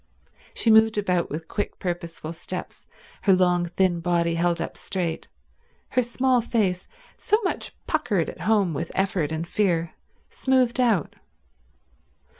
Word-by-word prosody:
She 225 - +3
moved 220 0 +5
about 180 -4 0
with 160 +2 -5
quick, 205 - -3
purposeful 170 -3 -5
steps, 180 +2 -7 0.3
her 195 - +4
long 180 -1 +3
thin 175 0 +1
body 170 -1 +1
held 170 0 +1
up - - -4
straight, 175 -4 -3 0.6
her 255 - +2
small 250 +1 +1
face, 200 -6 0 0.3
so 425 - +3
much 375 - -2
puckered 205 - 0
at - - -8
home 205 -6 +2
with 165 +3 -4
effort 190 -5 0
and 160 +1 -3
fear, 170 -5 0 0.4
smoothed 260 -2 +1
out. 225 - +1
180 Hz, 135 wpm, -25 LUFS, 170-220 Hz, 0.6 s, moved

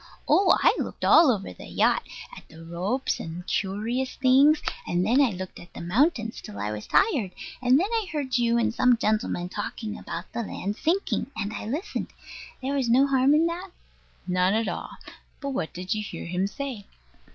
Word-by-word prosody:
Oh, 375 -2 +5
I - - +6
looked - - -4
all 325 -3 +7
over 195 - -3
the - - -11
yacht, - - +2 0.3
at - - -13
the 160 +1 -13
ropes 185 +11 -2
and 170 +2 -7
curious 220 +8 -2
things; 275 +4 +5 0.3
and 175 +1 +1
then 245 +7 +4
I 270 - +4
looked 185 -2 -7
at 175 - -14
the - - -7
mountains, 225 - +1
till 100 - -10
I 105 +1 -2
was 105 0 -6
tired; 285 - +2 0.3
and 255 +2 +5
then 365 - +2
I 445 -4 0
heard 285 -4 -2
you 235 0 +2
and 235 - +1
some 250 0 +4
gentleman 215 -5 0
talking 210 +3 -5
about 175 - -6
the 235 - -2
land 205 -2 -4
sinking, 340 - 0
and 215 -1 -3
I 210 - -5
listened. 325 - -3 0.6
There 270 +2 -1
was 265 -4 0
no 255 +4 +5
harm 275 +1 +4
in 320 +2 +4
that? 350 +3 -3 0.6
None 180 +2 +2
at 225 0 0
all. - - -4 0.5
But 280 - -4
what 165 -11 -3
did 180 +4 -3
you 215 - -2
hear 190 -5 -7
him 180 +3 -1
say? 250 -3 -6
230 Hz, 195 wpm, -26 LUFS, 185-275 Hz, 0.6 s, all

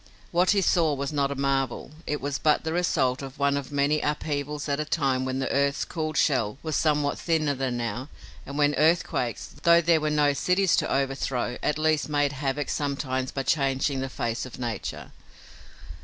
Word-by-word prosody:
What 175 +2 +3
he 200 -2 +4
saw 165 -5 +3
was 140 +2 -3
not 140 -2 +1
a - - -2
marvel. 135 -2 -1 0.2
It 150 - -2
was 140 0 -2
but 150 -1 +2
the 160 0 -2
result 135 -7 +1
of 135 -1 -8
one 140 0 +2
of 140 -1 -4
many 145 +1 +1
upheavals 150 0 -2
at 140 0 0
a - - +1
time 135 -4 0
when 130 0 -2
the 135 - -2
earth's 140 +1 +1
cooled 155 -2 -3
shell 125 -6 +2
was 155 -2 -2
somewhat 150 -2 +1
thinner 155 -4 +1
than 130 -2 -2
now 120 +4 -4 0.3
and 140 - -7
when 145 0 +3
earthquakes, 155 -7 +1
though 170 0 +6
there 170 -1 +3
were 155 - 0
no 150 -1 +3
cities 180 +5 +2
to - - 0
overthrow, 135 -2 -1
at 150 - 0
least 155 -1 +1
made 145 -1 +1
havoc 140 +1 -2
sometimes 135 -3 -2
by 135 - -3
changing 135 -1 +1
the 135 0 -3
face 115 -2 -3
of 130 - -8
nature. 120 -4 -5
145 Hz, 190 wpm, -26 LUFS, 135-155 Hz, 0.3 s, though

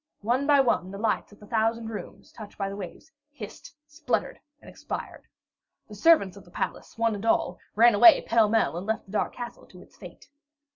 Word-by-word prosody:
One 245 +7 0
by 290 -2 +5
one, 230 -8 0
the 195 - -8
lights 215 0 -1
in 205 - -16
the 210 - -15
thousand 225 +1 -1
rooms, 220 - -9
touched 215 -3 -12
by 195 -1 -2
the 195 - -6
waves, 200 - -9 0.2
hissed, 240 -4 -11
sputtered, 300 +1 -3 0.2
and - - -18
expired. - - -8 0.6
The 215 - -12
servants 205 - +4
of 200 - -13
the - - -19
palace, 175 - -5
one 230 -1 +1
and 205 0 -6
all, 230 - +1 0.2
ran 235 +2 +6
away 330 +11 +8
pell 225 -2 +3
mell, 225 -5 +1
and 185 +4 -6
left 220 0 -2
the 190 - -16
dark 215 - -2
castle 240 -1 -8
to - - -15
its - - -23
fate. - - -13
220 Hz, 205 wpm, -26 LUFS, 205-240 Hz, 0.6 s, away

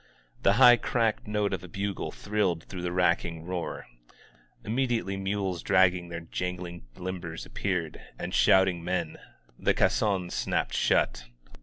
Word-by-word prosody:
The 100 - +4
hij^ 120 +1 +7
cracked 115 -4 0
note 105 -1 0
of 95 - -3
a - - -8
bogle 100 +2 -3
thrilled 100 -6 -1
throo^ 90 -2 -6
the 90 0 -2
racking 85 -2 +1
roar. 90 -1 -4 0.8
Immediately 115 -3 0
nraks 95 -2 -2
dragging 90 -2 +3
their 85 0 -5
jan^ng 90 +1 -5
limbers 90 -3 -5
appeared, 90 -5 -3 0.2
and - - -5
shooting 95 -3 +4
men. 90 +1 -2 0.5
Hie - - +4
caissons 95 -4 +1
snapped - - -1
shut. - - +1
95 Hz, 135 wpm, -28 LUFS, 85-100 Hz, 0.8 s, hij^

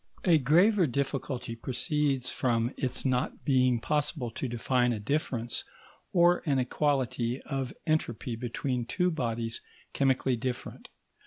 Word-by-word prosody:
A 170 -4 +6
graver 175 - +4
difficulty 135 -2 -2
proceeds 135 +2 0
from 120 -1 0
its 130 -1 -2
not 130 -1 -1
being 130 -3 +3
possible 145 -2 -1
to 130 - -3
define 120 +1 +1
a 110 - -3
difference, 120 0 -2 0.5
or 175 0 +4
an 140 -2 +3
equality, 130 -2 0
of 135 -3 -3
entropy 125 -6 -1
between 125 +2 -2
two 180 +8 +1
bodies 115 -6 -2 0.3
chemically 130 -2 +2
different. 125 +1 -5
130 Hz, 125 wpm, -29 LUFS, 120-145 Hz, 0.5 s, A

